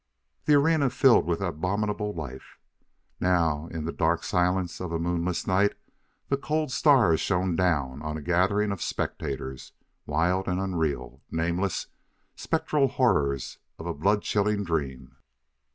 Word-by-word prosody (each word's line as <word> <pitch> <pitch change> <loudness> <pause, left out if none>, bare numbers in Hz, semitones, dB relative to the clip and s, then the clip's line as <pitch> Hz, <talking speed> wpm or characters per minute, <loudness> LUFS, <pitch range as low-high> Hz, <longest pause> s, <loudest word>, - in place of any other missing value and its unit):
The 150 - +5
arena 145 -1 +3
filled 125 -3 +4
with 85 +1 -1
abominable 100 +4 -1
life. 70 -8 -8 0.6
Now, 85 -4 +1
in 80 -2 -5
the 85 - -2
dark 85 +1 0
silence 90 0 0
of 90 -2 -4
a 85 - 0
moonless 85 +1 -1
night, 95 +2 +2 0.5
the 140 - +1
cold 155 0 -1
stars 125 - +4
shone 90 -2 0
down 75 -7 0
on 75 0 -4
a - - -6
gathering 95 +5 +2
of 100 - -4
spectators, 65 -1 -4 0.3
wild 85 +6 +1
and 90 0 0
unreal 85 -6 -2
nameless, 85 +3 -1 0.5
spectral 145 -3 +1
horrors 75 - 0 0.2
of 80 - -9
a 85 - -2
blood 100 +7 +1
chilling 105 0 +1
dream. 75 -7 -3
90 Hz, 135 wpm, -27 LUFS, 80-105 Hz, 0.6 s, The